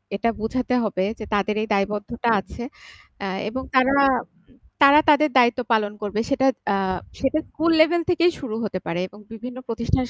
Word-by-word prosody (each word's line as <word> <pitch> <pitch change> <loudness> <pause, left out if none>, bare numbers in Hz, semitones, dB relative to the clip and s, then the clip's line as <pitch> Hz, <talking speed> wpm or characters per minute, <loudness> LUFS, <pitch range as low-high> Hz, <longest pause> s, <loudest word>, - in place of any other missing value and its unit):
এটা 230 +3 0
বুঝাতে 250 +3 -2
হবে 185 -3 -1 0.2
যে, - - -6
তাদের 205 +1 +1
এই 220 - -3
দায়বদ্ধতা 210 +4 -1
আছে। 235 +5 -8 0.6
আ - - -2 0.2
এবং 260 +3 -5
তারা, 260 +1 +4 0.9
তারা 285 +2 +8
উম - - -22
তাদের 300 +1 +5
দায়িত্ব 245 0 +4
পালন 210 -1 +1
করবে। 205 +1 -3
সেটা 270 -1 +2 0.3
আ - - +2 0.5
সেটা 275 +3 +1
স্কুল 330 +2 0
লেভেল 340 +2 +3
থেকেই 350 0 +3
শুরু 230 -6 -5
হতে 185 -3 -3
পারে 170 +1 -2
এবং 205 +3 -16
বিভিন্ন 245 +3 -8
প্রতিষ্ঠানের 235 +2 -1
240 Hz, 170 wpm, -23 LUFS, 210-270 Hz, 0.9 s, তারা